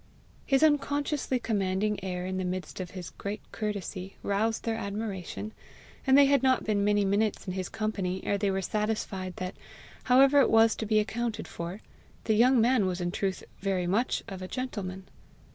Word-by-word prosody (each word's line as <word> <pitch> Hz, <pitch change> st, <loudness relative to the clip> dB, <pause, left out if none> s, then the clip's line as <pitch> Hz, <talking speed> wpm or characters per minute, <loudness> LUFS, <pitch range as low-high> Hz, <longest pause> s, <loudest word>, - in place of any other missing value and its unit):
His 270 Hz, +1 st, +3 dB
unconsciously 290 Hz, -2 st, +1 dB
commanding 200 Hz, -3 st, -1 dB
air 180 Hz, -1 st, -3 dB
in 185 Hz, 0 st, -3 dB
the 185 Hz, -, -1 dB
midst 180 Hz, +1 st, -4 dB
of 185 Hz, -2 st, -4 dB
his 180 Hz, -1 st, -8 dB
great 200 Hz, +1 st, -5 dB
courtesy, 195 Hz, -3 st, -4 dB
roused 215 Hz, +3 st, 0 dB
their 230 Hz, -, 0 dB
admiration, 205 Hz, -1 st, -4 dB, 0.6 s
and 265 Hz, +1 st, +7 dB
they 285 Hz, -, +8 dB
had 280 Hz, -1 st, +4 dB
not 260 Hz, -1 st, +3 dB
been 205 Hz, -2 st, +1 dB
many 205 Hz, 0 st, +3 dB
minutes 205 Hz, +2 st, +1 dB
in 185 Hz, -, -3 dB
his 185 Hz, -1 st, -3 dB
company 195 Hz, -4 st, -2 dB
ere 200 Hz, -, 0 dB
they 200 Hz, 0 st, +1 dB
were 190 Hz, 0 st, -1 dB
satisfied 210 Hz, -4 st, -2 dB
that, 185 Hz, 0 st, -4 dB, 0.5 s
however 270 Hz, +3 st, +6 dB
it -, -, +3 dB
was 225 Hz, 0 st, +5 dB
to 220 Hz, -, -3 dB
be 215 Hz, 0 st, +3 dB
accounted 220 Hz, +1 st, -1 dB
for, 170 Hz, +5 st, -6 dB, 0.4 s
the 220 Hz, -, +2 dB
young 245 Hz, +4 st, +5 dB
man 230 Hz, -3 st, +3 dB
was 180 Hz, 0 st, -2 dB
in 175 Hz, 0 st, -1 dB
truth 190 Hz, 0 st, -2 dB, 0.2 s
very 190 Hz, -2 st, 0 dB
much 210 Hz, +8 st, 0 dB
of 190 Hz, -1 st, -7 dB
a 185 Hz, -, -5 dB
gentleman. 195 Hz, -7 st, -5 dB
205 Hz, 180 wpm, -29 LUFS, 185-230 Hz, 0.6 s, they